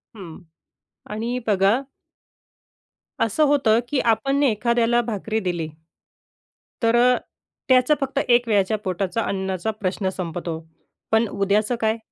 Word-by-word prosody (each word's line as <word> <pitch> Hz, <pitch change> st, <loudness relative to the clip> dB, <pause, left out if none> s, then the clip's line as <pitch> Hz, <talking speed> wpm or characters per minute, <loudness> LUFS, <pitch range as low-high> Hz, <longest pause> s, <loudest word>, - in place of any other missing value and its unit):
हं 175 Hz, -6 st, -10 dB, 0.7 s
आणि 230 Hz, +4 st, -2 dB
बघा 200 Hz, +2 st, +3 dB, 1.5 s
असं 230 Hz, +8 st, +1 dB
होतं 250 Hz, -6 st, +3 dB
की 285 Hz, -, 0 dB
आपणने 275 Hz, +5 st, +1 dB
एखाद्याला 235 Hz, +2 st, +2 dB
भाकरी 220 Hz, -1 st, -3 dB
दिली 175 Hz, -5 st, -2 dB, 1.2 s
तर 230 Hz, +1 st, +3 dB
अ, 250 Hz, +1 st, +5 dB, 0.5 s
त्याचं 255 Hz, +3 st, +5 dB
फक्त 275 Hz, 0 st, -1 dB
एक 240 Hz, -1 st, +3 dB
वेळच्या 210 Hz, 0 st, +2 dB
पोटाचा 190 Hz, +1 st, -2 dB
अन्नाचा 190 Hz, +1 st, -2 dB
प्रश्न 190 Hz, +1 st, -1 dB
संपतो. 170 Hz, -2 st, -4 dB, 0.5 s
पण 220 Hz, +1 st, +3 dB
उद्याचं 205 Hz, +3 st, 0 dB
काय? 220 Hz, +1 st, +1 dB
220 Hz, 115 wpm, -22 LUFS, 195-240 Hz, 1.5 s, अ